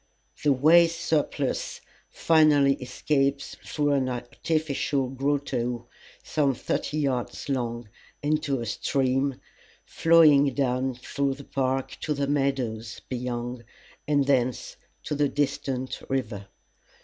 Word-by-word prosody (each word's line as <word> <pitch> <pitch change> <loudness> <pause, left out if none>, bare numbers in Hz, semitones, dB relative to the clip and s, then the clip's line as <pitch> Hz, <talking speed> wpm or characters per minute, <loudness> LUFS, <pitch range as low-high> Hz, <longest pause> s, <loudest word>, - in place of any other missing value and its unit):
The 145 - +4
waste 165 +5 +5
surplus 150 -4 -1 0.3
finally 150 -4 +4
escapes 135 +2 -1
through 145 -1 0
an 135 -2 +1
artificial 140 +2 -1
grotto, 130 -3 -2 0.4
some 140 -4 +1
thirty 150 - -2
yards 135 -4 -2
long, 120 -3 -2 0.4
into 145 -3 0
a - - -4
stream, 135 +3 0 0.5
flowing 150 -4 +5
down 130 -1 0
through 135 +2 -2
the 140 - -11
park 135 -1 -2
to 150 - -1
the 140 0 0
meadows 135 -6 -1
beyond, 120 -1 -4 0.4
and 145 -2 +2
thence 130 -3 0 0.3
to - - -3
the 145 -1 +1
distant 135 -2 -2
river. 110 -7 -3
135 Hz, 110 wpm, -26 LUFS, 125-145 Hz, 0.5 s, waste